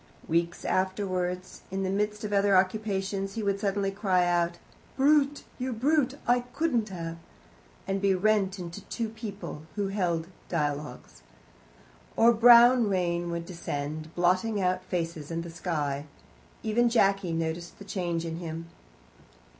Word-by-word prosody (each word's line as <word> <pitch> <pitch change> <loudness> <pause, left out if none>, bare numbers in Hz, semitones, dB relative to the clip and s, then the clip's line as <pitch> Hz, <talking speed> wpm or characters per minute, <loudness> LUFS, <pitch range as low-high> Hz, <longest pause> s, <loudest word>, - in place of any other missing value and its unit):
Weeks 170 +1 0
afterwards, 185 -1 -1
in 195 +1 -2
the 190 - -1
midst 210 +1 -1
of 210 -1 -3
other 200 -1 +4
occupations, 195 0 0
he 225 - -2
would 200 -1 0
suddenly 200 -1 0
cry 190 -3 +2
out, 175 0 +1 0.4
"Brute 285 +1 +3 0.2
you 255 0 -2
brute, 275 +3 +2
I 245 +1 +4
couldn't 275 -8 0
have 165 -3 -5 0.4
" - - -29
and 195 0 -1
be 195 -1 +3
rent 200 0 +2
into 175 +2 -7
two 230 -2 -3
people 215 -8 -7
who 200 -2 -1
held 175 -5 0 0.2
dialogues. 145 - -3 0.9
Or 235 +1 +6
brown 240 0 +7
rain 175 -2 0
would 170 0 -3
descend, 155 -3 -5
blotting 185 +5 +2
out 185 -1 0
faces 165 -5 -3
and 165 0 -3
the 170 - -8
sky. 150 -4 -2 0.6
Even 235 +2 +2
Jacky 195 -5 +2
noticed 165 +1 -3
the 200 - -11
change 175 -4 -2
in 165 0 -4
him. 165 -1 -6
190 Hz, 145 wpm, -28 LUFS, 170-210 Hz, 0.9 s, brown